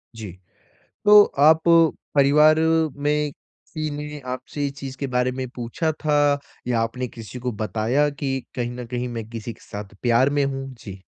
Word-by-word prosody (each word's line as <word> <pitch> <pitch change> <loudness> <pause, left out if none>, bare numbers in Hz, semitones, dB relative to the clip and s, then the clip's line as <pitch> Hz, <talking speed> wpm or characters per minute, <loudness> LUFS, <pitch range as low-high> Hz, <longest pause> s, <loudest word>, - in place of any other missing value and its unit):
जी। 105 -5 -7 0.7
तो 210 0 +9 0.2
आप 155 +2 +6 0.5
परिवार 150 +3 +5 0.4
में 150 0 0 0.4
किसी 155 -1 -2
ने 150 0 -6
आपसे 145 +3 -5
ये 140 - 0
चीज़ 135 -1 -8
के 140 - -3
बारे 125 0 0
में 130 0 -4
पूछा 125 +7 -2
था, 145 -2 +1 0.3
या 120 -2 +1
आपने 125 +3 -2
किसी 115 0 -9
को 125 0 -3
बताया 115 +7 0
कि, 135 -2 -3 0.2
"कहीं 120 -1 -2
न 125 0 -7
कहीं, 125 +1 -3
मैं 115 -2 -5
किसी 115 0 -6
के - - -21
साथ 105 -2 -9
प्यार 125 +3 +3
में 145 0 +1
हूँ"? 135 0 -4
जी। 100 -4 -10
130 Hz, 170 wpm, -23 LUFS, 120-145 Hz, 0.7 s, तो